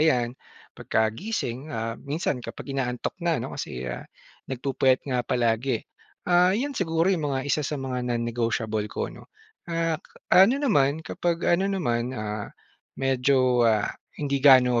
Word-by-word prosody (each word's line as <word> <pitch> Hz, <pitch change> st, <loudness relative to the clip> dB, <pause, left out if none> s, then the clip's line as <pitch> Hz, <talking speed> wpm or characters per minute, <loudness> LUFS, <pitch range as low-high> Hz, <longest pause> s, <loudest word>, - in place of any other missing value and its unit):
ayan, 125 Hz, -7 st, +3 dB, 0.4 s
'pagkagising, 125 Hz, -, -2 dB
ah, 115 Hz, -5 st, -3 dB
minsan 140 Hz, -3 st, -2 dB
kapag 135 Hz, -, -7 dB
inaantok 125 Hz, -3 st, -2 dB
na, 170 Hz, -2 st, +1 dB
ano, -, -, -5 dB
kasi, 65 Hz, 0 st, -5 dB
ah, -, -, -5 dB, 0.4 s
nagpupuyat 130 Hz, 0 st, +1 dB
nga 125 Hz, -3 st, 0 dB
palagi. 120 Hz, +1 st, 0 dB, 0.4 s
Ah, 180 Hz, +2 st, +4 dB
'yon 280 Hz, +5 st, -1 dB
siguro 165 Hz, -3 st, +1 dB
'yong 175 Hz, -, 0 dB
mga 130 Hz, -, 0 dB
isa 150 Hz, -, +2 dB
sa 150 Hz, -, -2 dB
mga 130 Hz, -2 st, -3 dB
non-negotiable 115 Hz, -2 st, -1 dB
ko, -, -, -4 dB
'no. -, -, -14 dB, 0.4 s
Ah, 165 Hz, -1 st, 0 dB
ka -, -, -23 dB, 0.2 s
ano 195 Hz, +8 st, +7 dB
naman, 160 Hz, -, +2 dB
kapag 170 Hz, -1 st, -2 dB
ano 190 Hz, +3 st, +3 dB
naman, 125 Hz, -10 st, -1 dB
ah, 105 Hz, -1 st, -4 dB, 0.5 s
medyo, 130 Hz, -1 st, +2 dB
ah, 105 Hz, -2 st, +1 dB, 0.2 s
hindi 140 Hz, -2 st, -1 dB
gaano 130 Hz, -3 st, +6 dB
135 Hz, 145 wpm, -26 LUFS, 120-165 Hz, 0.5 s, ano